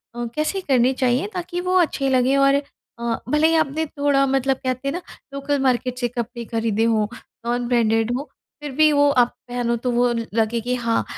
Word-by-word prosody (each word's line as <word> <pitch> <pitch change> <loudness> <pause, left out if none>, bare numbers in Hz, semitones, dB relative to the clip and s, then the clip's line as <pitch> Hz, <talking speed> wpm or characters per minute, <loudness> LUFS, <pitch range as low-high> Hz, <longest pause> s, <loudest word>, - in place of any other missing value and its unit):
अ, 240 - -3
कैसे 310 +6 -1
करने 260 -5 +2
चाहिए 255 +6 +1
ताकि 355 -1 -4
वो 365 +1 0
अच्छे 280 -5 +1
लगे 260 +1 +3
और 275 0 +4 0.5
अ, 235 -1 -1
भले 300 +2 +4
ही 325 - +2
आपने 315 0 +1
थोड़ा 285 -2 +1
मतलब 270 0 +1
कहते 255 +1 -2
हैं 275 - -1
ना 360 - -4 0.3
लोकल 280 0 -1
मार्केट 250 -1 0
से 245 - 0
कपड़े 235 0 -5
खरीदे 225 -1 -1
हो 215 -2 +2 0.4
नॉन 240 0 -1
ब्रांडेड 225 -1 +2
हो, 275 - -2 0.4
फ़िर 295 -1 -5
भी 305 +3 +4
वो 285 0 +4
आप 245 -3 +4 0.2
पहनो 245 -1 -1
तो 245 +2 -2
वो 245 +1 +3 0.3
लगे 225 +1 +1
कि 250 +2 -1
हाँ, 230 -2 0
255 Hz, 200 wpm, -22 LUFS, 235-285 Hz, 0.5 s, और